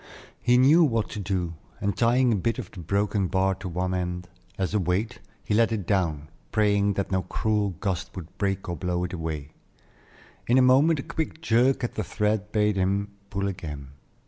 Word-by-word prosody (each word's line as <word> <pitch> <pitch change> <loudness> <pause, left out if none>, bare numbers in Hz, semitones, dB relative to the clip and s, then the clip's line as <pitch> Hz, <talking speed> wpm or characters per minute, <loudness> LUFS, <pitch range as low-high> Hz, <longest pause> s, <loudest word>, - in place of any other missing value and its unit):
He 120 0 +4
knew 145 +7 +6
what 115 -7 +1
to 105 - -6
do, 90 -4 -2 0.3
and 100 -1 -1
tying 120 +2 +3
a - - +2
bit 115 +4 -1
of 120 -8 -6
the 100 - -10
broken 100 +3 0
bar 95 +1 +2
to 95 0 -6
one 90 +2 -2
end, 90 -1 -3 0.3
as 95 +1 -1
a 105 - +3
weight, 95 +6 -1 0.2
he - - -2
let 115 +2 +4
it 105 -5 -2
down, 80 -6 0 0.2
praying 100 -1 +2
that 100 0 -3
no 95 -1 +2
cruel 105 +1 -1
gust 95 -3 -3
would 90 -3 -9
break 95 -1 -1
or 85 - -2
blow 90 0 -2
it 90 +1 -4
away. 80 -4 -4 1.0
In 120 - +4
a - - +6
moment 140 +5 +5
a - - -11
quick 160 0 -4
jerk 125 -2 +2
at 120 - -2
the 110 - -2
thread 105 +2 -1
bade 105 -1 +2
him 100 +2 0 0.2
pull 100 -1 -1
again. 75 -8 -6
100 Hz, 200 wpm, -26 LUFS, 90-110 Hz, 1.0 s, knew